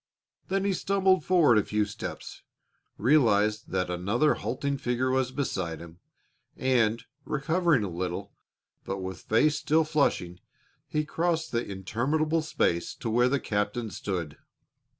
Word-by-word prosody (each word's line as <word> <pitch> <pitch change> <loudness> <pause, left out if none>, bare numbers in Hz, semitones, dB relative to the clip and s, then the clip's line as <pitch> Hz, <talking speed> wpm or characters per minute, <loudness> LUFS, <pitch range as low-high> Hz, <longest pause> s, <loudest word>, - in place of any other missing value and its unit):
Then 195 +1 0
he 200 - +2
stumbled 190 -2 +2
forward 160 -12 +5
a - - +1
few 105 0 0
steps, 105 - -7 0.6
realized 110 -5 +3
that 90 -1 -1
another 105 +12 +2
halting 140 +2 -3
figure 125 +1 0
was 130 -1 +1
beside 95 - -3
him, 85 +1 -12 0.6
and, 120 -4 +1 0.2
recovering 150 - +1
a - - -2
little, 90 0 -4 0.5
but 95 - -4
with 95 -3 -6
face 150 +7 +2
still 155 +2 +3
flushing, 140 - 0 0.5
he 150 0 -1
crossed 165 +1 -1
the 115 0 0
interminable 135 - -1
space 85 - -1
to 115 - -4
where 120 +2 +3
the 140 +1 +1
captain 105 +1 -2
stood. 85 -4 -4
120 Hz, 135 wpm, -28 LUFS, 100-155 Hz, 0.6 s, forward